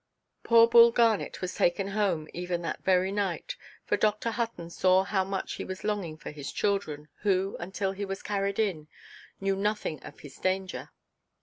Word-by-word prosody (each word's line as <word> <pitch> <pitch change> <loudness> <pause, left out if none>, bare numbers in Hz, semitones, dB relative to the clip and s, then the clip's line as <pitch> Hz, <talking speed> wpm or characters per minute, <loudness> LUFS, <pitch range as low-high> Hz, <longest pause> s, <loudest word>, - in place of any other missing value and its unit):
Poor 230 0 +6
Bull 235 0 +8
Garnet 230 -2 +1
was 185 0 -3
taken 195 +3 +1
home, 195 -7 0
even 175 0 -3
that - - -4
very 185 0 +3
night. 200 -4 -2 0.3
For - - +1
Dr. 215 +2 +1
Hutton 225 -7 -3
saw 185 +2 +4
how 195 -1 0
much 195 0 -3
he - - -5
was 185 0 -7
longing 200 -7 -2
for - - -8
his 145 -2 -6
children, 175 -8 -1
who 195 -1 +1
(until 190 +2 -2
he 195 +1 -5
was 195 0 -5
carried 200 -1 -1
in) 185 -9 -1 0.5
knew 195 0 0
nothing 200 -7 -2
of - - -11
his 140 -2 -12
danger. 185 0 -2
195 Hz, 175 wpm, -28 LUFS, 180-205 Hz, 0.5 s, Bull